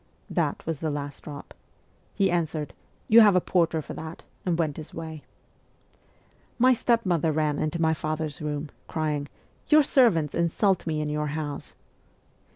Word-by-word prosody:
That - - -1
was 160 -3 -3
the 160 - -1
last 145 -1 -5
drop. 145 -2 -9 0.6
He 195 -3 +2
answered, 160 -4 -1 0.2
' - - -37
You 230 +1 +8
have 205 -3 +6
a - - +6
porter 165 -3 +1
for - - -7
that/ 160 +1 -8 0.2
and 170 -2 +1
went 155 -4 -1
his 155 -1 -9
way. 160 -2 -6 1.4
My 255 +1 +6
stepmother 185 -10 +1
ran 150 -1 0
into 160 +1 +1
father's 155 -2 -3
room, 150 0 -3 0.2
crying, 150 -3 -2 0.2
' - - -37
Your 305 0 +7
servants 200 - +3
insult 170 +2 +1
me 155 -1 0
in 150 - -2
your 150 0 -1
house 150 -1 -5
160 Hz, 160 wpm, -26 LUFS, 150-175 Hz, 1.4 s, You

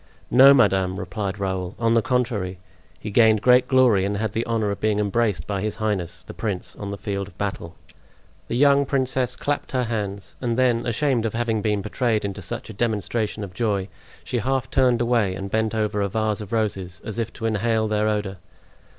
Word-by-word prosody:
"No, 135 +3 +8
madame," 95 -8 +3
replied 95 +2 -4
Raoul; 95 -1 -3
"on 115 -1 +2
the 115 - +4
contrary, 110 -7 -1 0.4
he 105 - -6
gained 110 -1 +4
great 125 +1 +5
glory 125 -7 +4
and 100 +1 -1
had 110 0 -1
the 115 +2 -1
honor 110 -3 0
of 100 - -4
being 110 -1 +1
embraced 105 -5 0
by 100 0 -2
his 105 0 -2
highness, 105 -6 -3
the - - -10
prince, 100 -5 -4
on 100 - -6
the 100 - -5
field 100 -1 -3
of - - -17
battle." 95 -4 -4 0.7
The 120 - -2
young 140 +1 +5
princess 130 -2 0
clapped 145 +1 -3
her 130 -1 +1
hands; 100 -4 -4
and 120 -2 -1
then, 120 -2 +2
ashamed 120 -1 +1
of 110 - -5
having 115 -2 0
been 105 -1 0
betrayed 110 0 0
into 100 0 -4
such 90 - -5
a 110 - -8
demonstration 110 0 -1
of 95 -2 -8
joy, 100 -2 -1 0.3
she 120 - -2
half 130 +3 -1
turned 125 -3 +3
away 115 -6 +1
and 95 0 -6
bent 110 0 0
over 105 -1 0
a 100 - 0
vase 110 +1 -1
of 105 - -9
roses, 100 -5 -2
as 110 +1 -5
if 115 0 -2
to 115 - -6
inhale 110 0 +1
their 105 0 +1
odor. 105 -3 -1
110 Hz, 200 wpm, -23 LUFS, 100-120 Hz, 0.7 s, No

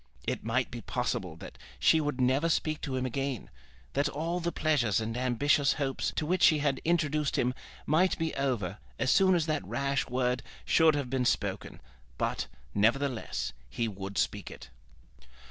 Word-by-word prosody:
It - - -2
might 120 +3 0
be 120 -1 -6
possible - - -2
that - - -11 0.2
she 160 - +5
would 145 -3 -2
never 130 +6 +2
speak 155 -1 0
to 135 -4 -3
him 130 0 -1
again; 135 -1 -3 0.4
that 140 +1 +1
all 165 +5 -2
the 170 0 -1
pleasures 130 - +2
and 115 +1 -3
ambitious 130 +3 +2
hopes 135 -2 -1
to 155 - -1
which 180 +3 0
she 155 - +6
had 140 -2 0
introduced 155 -3 +1
him 125 +1 +1 0.3
might 170 +5 +3
be 165 -1 -1
over 115 -9 -1 0.2
as 130 - +1
soon 190 -1 +5
as 165 -3 +1
that 155 -2 -1
rash 140 -1 -1
word 125 0 0 0.2
should 160 -2 +5
have 140 -4 -3
been 130 -2 +1
spoken! - - -1 0.4
But, - - -1 0.3
nevertheless, 120 +3 0 0.2
he 115 - -1
would 100 -1 -6
speak 100 -1 -1
it. - - -11
140 Hz, 170 wpm, -30 LUFS, 125-155 Hz, 0.4 s, she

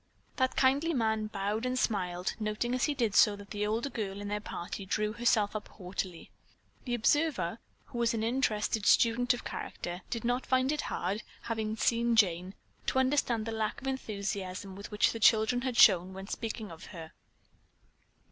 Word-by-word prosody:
That 260 -2 +1
kindly 285 +5 +3
man 220 -3 +1
bowed 210 +1 -2
and 255 0 -1
smiled, 180 -6 -1
noting 215 +3 -1
as 255 - +2
he 295 - -1
did 230 -6 0
so 205 +1 +6
that 200 0 -12
the 210 0 -1
older 230 +6 -1
girl 200 -3 -4
in 205 0 -5
their 210 0 -1
party 195 -1 -6
drew 210 +2 -1
herself 220 -3 +2
up 210 - -4
haughtily. 180 -2 -6 0.5
The 245 -2 0
observer, 235 - +1 0.3
who 245 -4 -7
was 235 0 +2
an 220 - -1
interested 225 -3 0
student 240 +1 +4
of 245 - -9
character, 175 +1 -5
did 230 - -3
not 245 +2 0
find 260 +1 +2
it 300 -1 -1
hard, 195 +5 -2 0.2
having 220 -2 -2
seen 235 +1 +2
Jane, 185 -2 +2 0.3
to - - +1
understand 260 -4 +2
the 225 - -3
lack 220 -1 -2
of - - -12
enthusiasm 200 -6 -4
which 205 +2 +1
the 230 - -5
children 220 +3 +4
had 255 -2 -2
shown 185 -3 +6
when 190 +1 -7
speaking 220 -2 -5
of 165 - -10
her. 165 -4 -9
220 Hz, 175 wpm, -31 LUFS, 200-240 Hz, 0.5 s, so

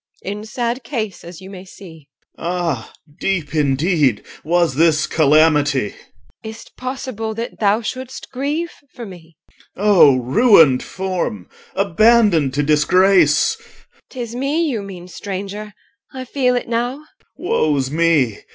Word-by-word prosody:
In 205 +2 -5
sad 240 +2 -3
case, 225 -6 -5
as 175 +1 -11
you 190 +1 -11
may 185 -2 -9
see 165 -6 -14 0.3
OR. - - -23
Ah! 170 -9 -3 0.3
deep 170 -7 -2
indeed 145 - +1 0.2
was 170 -2 +1
this 155 +1 +3
calamity! 150 -6 +2 0.5
EL. 220 - -6
Is't 220 +1 -12
possible 255 -4 -5
that 230 +2 -6
thou 210 +2 +2
shouldst 260 +3 -7
grieve 295 +6 -3 0.2
for 240 - -7
me? 170 -5 -14 0.4
OR. 200 - -5
O 180 -10 +6
ruined 150 - +4
form! 185 - -4 0.3
abandoned 200 - +3
to 145 - +1
disgrace! 170 - +3
EL. - - -21 0.4
'Tis 240 -3 -6
me 280 +6 0
you 235 -8 -2
mean, 185 -3 -9
stranger, 200 +3 -6 0.4
I 260 -1 -7
feel 250 -1 0
it 245 - -3
now. 245 +5 -2 0.3
OR. 360 - -7
Woe 155 - +2
's 130 0 -3
me! 155 -8 +1
190 Hz, 140 wpm, -19 LUFS, 155-235 Hz, 0.5 s, O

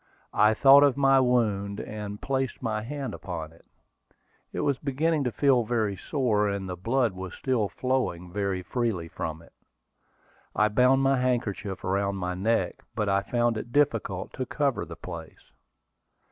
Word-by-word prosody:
I 105 +1 +4
thought 140 +3 +8
of 140 -2 +4
my 135 -1 +5
wound, 105 -6 +1
and 105 -1 -6
placed 135 -2 -2
my 110 -2 -1
hand 140 +4 -5
upon 80 -5 -6
it. 85 - -22 0.9
It - - -3
was 140 -2 0
beginning 150 +2 0
to 125 - 0
feel 130 -1 +3
very 110 -3 0
sore, 105 -3 0
and 100 -1 -3
the 90 - -4
blood 115 +4 0
was 95 0 -7
still 120 -6 0
flowing 125 -10 -2
very 100 -2 -1
freely 105 -4 -2
from 80 0 -5
it. - - -20 1.0
I 105 0 +3
bound 125 +5 +4
my 135 -1 +3
handkerchief 115 -6 -2
around 100 +1 0
my 90 -1 -2
neck, 95 0 0
but 105 -2 0
I 100 0 +2
found 120 0 0
it 115 +2 -6
difficult 115 -9 0
to 130 - -3
cover 140 -4 0
the - - -9
place. 85 -3 -10
110 Hz, 160 wpm, -27 LUFS, 100-130 Hz, 1.0 s, thought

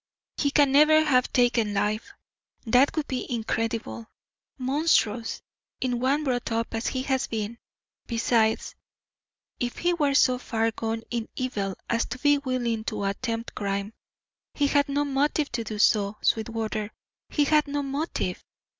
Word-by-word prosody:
He 285 - +2
can 285 -1 +4
never 305 +2 +6
have 255 -5 +2
taken 235 -4 +2
life. 215 - -1 0.5
That 250 +5 +4
would 310 -2 -1
be 255 -1 -4
incredible, 225 0 -2 0.5
monstrous, 255 -4 +1 0.4
in 250 -2 -1
one 275 +4 +1
brought 245 -4 -1
up 230 0 -1
as 225 +1 -2
he 260 -1 -2
has 265 -1 0
been. 220 +1 -4 0.5
Besides, 225 -1 +1 0.9
if 245 0 -3
he 350 0 +1
were 290 -5 +1
so 255 -2 +4
far 225 -2 0
gone 225 +1 -3
in 235 -2 -3
evil 200 -7 -2
as 230 0 +1
to 245 - -6
be 290 +2 +3
willing 245 -5 -1
to 215 -3 -3
attempt 225 +3 -3
crime, 200 +1 -3 0.6
he 290 - +2
had 285 0 +2
no 290 +1 +1
motive 285 +1 0
to 235 -1 -2
do 215 -1 -5
so; 205 -1 +3
Sweetwater, 220 -1 -1 0.4
he 295 - +2
had 300 +1 +3
no 285 0 -2
motive. 280 +4 -3
245 Hz, 150 wpm, -26 LUFS, 225-280 Hz, 0.9 s, never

